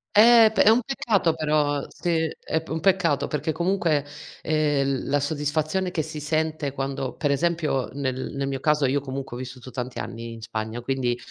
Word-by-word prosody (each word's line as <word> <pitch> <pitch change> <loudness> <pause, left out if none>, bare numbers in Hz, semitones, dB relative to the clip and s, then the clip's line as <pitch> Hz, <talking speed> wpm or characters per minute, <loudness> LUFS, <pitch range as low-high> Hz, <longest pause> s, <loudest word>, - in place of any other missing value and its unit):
Eh, 225 0 +8
p - - -11
è - - +4
un 235 +3 +5
peccato 215 -9 +1
però 150 -2 +1
se 165 -2 -1
è 160 - -1
p 160 - -16
un 160 0 -3
peccato 165 -7 +2
perché 155 +1 -2
comunque 170 -4 +1 0.4
ehm, 145 -4 +1
la 145 0 +1
soddisfazione 155 +5 -1
che 160 - 0
si 155 0 -6
sente 155 -1 -1
quando 135 -1 -3
per 145 -2 0
esempio 150 -5 0
nel 130 -1 -3
nel 140 0 -2
mio 135 -1 -3
caso 150 -1 +2
io 140 +2 +1
comunque 135 -2 -6
ho - - -7
vissuto 130 0 -8
tanti 125 0 -5
anni 115 0 -6
in 115 - -10
Spagna, 110 +1 -4
quindi, 125 -1 -1
145 Hz, 185 wpm, -25 LUFS, 135-160 Hz, 0.4 s, Eh